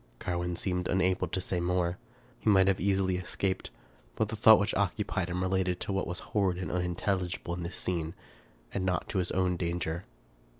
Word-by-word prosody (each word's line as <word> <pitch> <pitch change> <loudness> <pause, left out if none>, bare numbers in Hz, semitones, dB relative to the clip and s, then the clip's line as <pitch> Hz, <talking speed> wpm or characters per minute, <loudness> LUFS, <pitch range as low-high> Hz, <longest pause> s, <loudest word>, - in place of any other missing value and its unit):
Carwin 90 +2 -2
seemed 90 0 -1
unable 95 0 +2
to - - -2
say 90 -1 -1
more. 90 0 0 0.4
He - - +1
might 95 -2 +6
have 95 -1 +3
easily 95 -1 +2
escaped; 95 +1 -2 0.5
but 110 - 0
the 110 - -3
thought 110 +1 +8
which 100 0 0
occupied 100 -1 0
him 90 +1 -1
related 95 -1 +1
to 100 - -2
what 95 - 0
was 90 - -3 0.2
horrid 95 -4 +2
and 90 - -3
unintelligible 90 0 -1
in 90 - -4
this 85 +2 -5
scene, 85 -3 -2 0.6
and 95 - -1
not 90 -3 0
to 95 - 0
his 90 - 0
own 90 -1 +1
danger. 85 0 -2
90 Hz, 185 wpm, -30 LUFS, 90-95 Hz, 0.6 s, thought